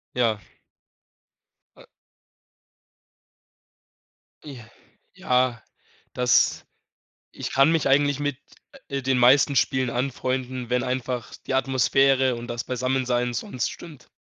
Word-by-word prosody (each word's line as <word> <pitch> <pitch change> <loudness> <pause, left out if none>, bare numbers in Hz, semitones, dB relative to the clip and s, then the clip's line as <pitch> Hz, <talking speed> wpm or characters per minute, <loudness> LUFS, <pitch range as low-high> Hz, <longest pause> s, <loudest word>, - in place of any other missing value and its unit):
Ja. 115 -4 +1 1.4
A - - -16 2.6
J 135 -6 -10 0.5
ja, 125 -2 0 0.5
das 125 -1 +2 0.7
Ich - - -6
kann 135 +3 +4
mich 165 -3 +1
eigentlich 145 0 +2
mit, 145 -2 -2 0.5
äh, 140 -2 -3
den 130 -1 +1
meisten 135 +3 +4
Spielen 130 -2 +1
anfreunden, 130 0 -3
wenn 125 0 +1
einfach 125 -2 -4
die - - -3
Atmosphäre 135 0 +2
und 120 0 -8
das 120 -1 -4
Beisammensein 125 -1 -1
sonst 125 +1 -3
stimmt. 155 -7 -12
130 Hz, 100 wpm, -24 LUFS, 125-135 Hz, 2.6 s, kann